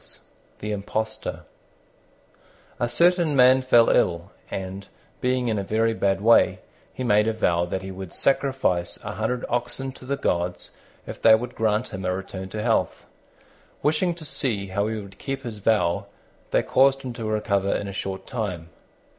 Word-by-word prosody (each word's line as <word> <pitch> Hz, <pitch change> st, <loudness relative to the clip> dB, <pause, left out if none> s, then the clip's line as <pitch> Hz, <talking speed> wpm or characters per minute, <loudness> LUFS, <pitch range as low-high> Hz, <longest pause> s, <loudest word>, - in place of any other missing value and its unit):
THE 105 Hz, -, -3 dB
IMPOSTOR 110 Hz, +2 st, -3 dB, 1.4 s
A 120 Hz, -, 0 dB
certain 170 Hz, +3 st, +3 dB
man 130 Hz, 0 st, +6 dB
fell 120 Hz, -3 st, +5 dB
ill, 85 Hz, +2 st, +1 dB, 0.2 s
and, 95 Hz, +1 st, -5 dB, 0.3 s
being 125 Hz, -1 st, 0 dB
in 110 Hz, -3 st, 0 dB
a -, -, -2 dB
very 115 Hz, +3 st, +1 dB
bad 100 Hz, -3 st, 0 dB
way, 115 Hz, +2 st, +5 dB, 0.3 s
he 130 Hz, -, -5 dB
made 105 Hz, -2 st, +3 dB
a 115 Hz, -, +1 dB
vow 85 Hz, -6 st, +1 dB
that 95 Hz, +2 st, -4 dB
he 95 Hz, -, -6 dB
would 95 Hz, -2 st, -8 dB
sacrifice 130 Hz, -11 st, +1 dB
a -, -, -4 dB
hundred 125 Hz, 0 st, -2 dB
oxen 120 Hz, +2 st, -2 dB
to 130 Hz, -, -14 dB
the 140 Hz, +2 st, -1 dB
gods 90 Hz, -4 st, -1 dB, 0.3 s
if -, -, -8 dB
they 110 Hz, -, +8 dB
would 120 Hz, +2 st, -4 dB
grant 110 Hz, +2 st, 0 dB
him 95 Hz, 0 st, -6 dB
a 90 Hz, 0 st, 0 dB
return 95 Hz, 0 st, -6 dB
to 105 Hz, +2 st, -4 dB
health. 115 Hz, -1 st, 0 dB, 0.8 s
Wishing 165 Hz, +4 st, +2 dB
to 165 Hz, -2 st, -10 dB
see 110 Hz, -10 st, -2 dB
how 100 Hz, +2 st, 0 dB
he 110 Hz, 0 st, -2 dB
would 100 Hz, -2 st, -11 dB
keep 135 Hz, 0 st, -4 dB
his 115 Hz, -4 st, -6 dB
vow, 100 Hz, -5 st, +1 dB, 0.4 s
they -, -, +2 dB
caused 135 Hz, +1 st, +3 dB
him 125 Hz, -2 st, -5 dB
to 115 Hz, -1 st, -6 dB
recover 105 Hz, -2 st, 0 dB
in 100 Hz, -, -1 dB
a 100 Hz, -, -6 dB
short 95 Hz, 0 st, -4 dB
time. 95 Hz, -9 st, -4 dB
110 Hz, 170 wpm, -24 LUFS, 95-125 Hz, 1.4 s, they